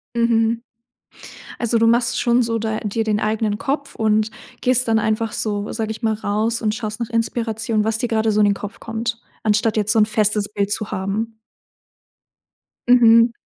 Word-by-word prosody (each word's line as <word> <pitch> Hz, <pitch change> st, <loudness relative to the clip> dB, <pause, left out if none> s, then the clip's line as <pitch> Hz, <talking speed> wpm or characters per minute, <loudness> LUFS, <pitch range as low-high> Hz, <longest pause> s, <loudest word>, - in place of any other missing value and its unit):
Mhm. 230 Hz, 0 st, +2 dB, 1.0 s
Also, 235 Hz, -1 st, +1 dB
du 230 Hz, -, +3 dB
machst 235 Hz, +1 st, +2 dB
schon 240 Hz, +1 st, +3 dB
so 230 Hz, 0 st, -1 dB
da 220 Hz, 0 st, -2 dB
dir 220 Hz, +2 st, -2 dB
den 215 Hz, -1 st, 0 dB
eigenen 215 Hz, -1 st, -1 dB
Kopf 280 Hz, +1 st, -3 dB
und 215 Hz, 0 st, +1 dB, 0.3 s
gehst 255 Hz, -1 st, +2 dB
dann 225 Hz, 0 st, +3 dB
einfach 220 Hz, +1 st, -1 dB
so, 205 Hz, -1 st, -2 dB
sage 220 Hz, -1 st, -3 dB
ich 220 Hz, +2 st, -6 dB
mal, 220 Hz, -1 st, +1 dB
raus 220 Hz, +2 st, -1 dB
und 215 Hz, 0 st, 0 dB
schaust 215 Hz, -1 st, -5 dB
nach 235 Hz, 0 st, -4 dB
Inspiration, 225 Hz, -1 st, -1 dB
was 220 Hz, 0 st, 0 dB
dir 245 Hz, -, -1 dB
gerade 220 Hz, -1 st, +1 dB
so 210 Hz, -, +2 dB
in 205 Hz, -, +5 dB
den 200 Hz, -, +3 dB
Kopf 205 Hz, +2 st, -8 dB
kommt, 230 Hz, +1 st, -4 dB, 0.2 s
anstatt 215 Hz, +1 st, +1 dB
jetzt 210 Hz, 0 st, +2 dB
so 225 Hz, -, +2 dB
'n 210 Hz, -, +5 dB
festes 210 Hz, -1 st, +1 dB
Bild 200 Hz, 0 st, -1 dB
zu 215 Hz, -1 st, -2 dB
haben? 215 Hz, +4 st, -3 dB, 1.5 s
Mhm. 230 Hz, -1 st, +6 dB
220 Hz, 185 wpm, -20 LUFS, 215-230 Hz, 1.5 s, Mhm